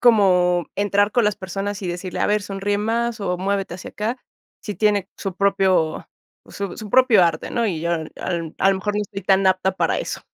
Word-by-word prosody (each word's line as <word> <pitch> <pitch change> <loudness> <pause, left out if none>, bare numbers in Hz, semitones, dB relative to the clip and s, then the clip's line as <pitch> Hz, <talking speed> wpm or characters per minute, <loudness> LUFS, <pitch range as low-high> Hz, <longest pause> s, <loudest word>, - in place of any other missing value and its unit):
como 180 -7 +4
entrar 205 0 +2
con 240 -3 +3
las 210 -1 +1
personas 195 +2 -4
y 185 - -3
decirle: 180 +1 -4
"A - - +2
ver, 210 0 +1
sonríe 200 +1 -2
más 230 +2 -1
o 180 -3 -1
muévete 195 -1 -1
hacia 185 - -8
acá", 230 +4 -3 0.4
si 210 - -5
tiene 205 -3 +1
su 195 -3 -4
propio 190 -5 +1 0.4
su 200 -3 -5
su 215 -3 -8
propio 240 -7 +6
arte, 165 -2 -1
¿no? 235 -1 0
Y 170 -7 -2
yo 170 +1 -1
al 160 -2 -3
al, 165 -3 -3
a 195 - +4
lo 195 - +1
mejor, 205 +2 -2
no 210 - 0
estoy 200 -1 -7
tan 190 +1 +3
apta 190 0 +2
para 190 - 0
eso. - - -4
195 Hz, 215 wpm, -22 LUFS, 185-210 Hz, 0.4 s, propio